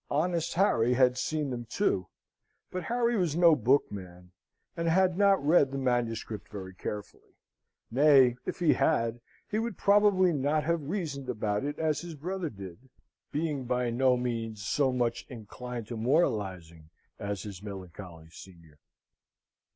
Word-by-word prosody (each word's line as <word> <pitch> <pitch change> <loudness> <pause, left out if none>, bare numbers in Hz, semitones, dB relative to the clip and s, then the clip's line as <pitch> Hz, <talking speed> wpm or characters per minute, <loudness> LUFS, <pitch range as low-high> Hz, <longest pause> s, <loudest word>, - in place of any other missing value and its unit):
Honest 170 +2 0
Harry 125 - +3
had 125 -1 +4
seen 145 +2 -2
them, 120 -1 -5
too, 110 - 0 0.6
but 185 -1 -4
Harry 240 0 +1
was 175 -7 0
no 170 -2 +6
bookman, 95 -9 -1 0.4
and 170 0 -2
had 180 +1 +3
not 195 -5 +3
read 150 -3 +5
the 135 - -5
manuscript 120 -4 -2
very 95 -3 -7
carefully: 105 +2 -8 0.6
nay, 135 -2 +5
if - - -3
he 170 -3 +3
had, 115 -6 +1 0.3
he 215 - -1
would 225 -4 -3
probably 200 -3 +4
not 145 +2 0
have 160 -2 -1
reasoned 150 -9 -4
about 105 -2 -1
it 145 +1 -3
as 155 -2 0
his 170 -2 -8
brother 175 +3 -4
did, 100 +3 -11 0.4
being 150 -3 -2
by 125 -1 0
no 125 +1 +3
means 115 -4 -3
so 135 +2 +1
much 120 -1 -1
inclined 120 0 -7
to 120 - -6
moralising 95 - -1 0.3
as 100 -1 -4
his 100 -3 -8
melancholy 90 -4 -9
senior. 85 -4 -15
125 Hz, 145 wpm, -29 LUFS, 105-160 Hz, 0.6 s, no